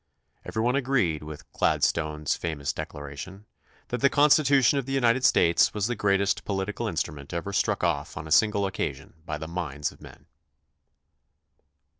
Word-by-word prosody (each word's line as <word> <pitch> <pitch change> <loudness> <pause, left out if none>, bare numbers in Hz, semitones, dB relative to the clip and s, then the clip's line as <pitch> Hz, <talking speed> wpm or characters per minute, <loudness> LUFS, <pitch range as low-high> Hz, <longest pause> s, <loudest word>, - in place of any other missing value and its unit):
Every 110 - -3
one 125 +2 +2
agreed 125 - +1
with 75 0 -9
Gladstone's 75 -2 0
fa 85 -2 -3
mous 70 -1 -3
declaration, 75 +8 -8 0.4
that 125 - -3
the 140 - +5
Constitution 140 -2 +4
of 135 - -6
the 135 - -3
United 120 0 +2
States 85 0 +4
was 105 -2 0
the 120 +2 -1
greatest 100 -1 +1
political 100 0 -3
instrument 70 +1 -4
ever 90 +4 -4
struck - - 0
off 75 -3 -1
on 75 - -6
a 80 - -9
single 100 +4 +4
occasion 70 -8 -4
by 75 - -3
the 80 +1 -7
minds 80 -4 -3
of - - -19
men. - - -14
95 Hz, 160 wpm, -26 LUFS, 75-120 Hz, 0.4 s, the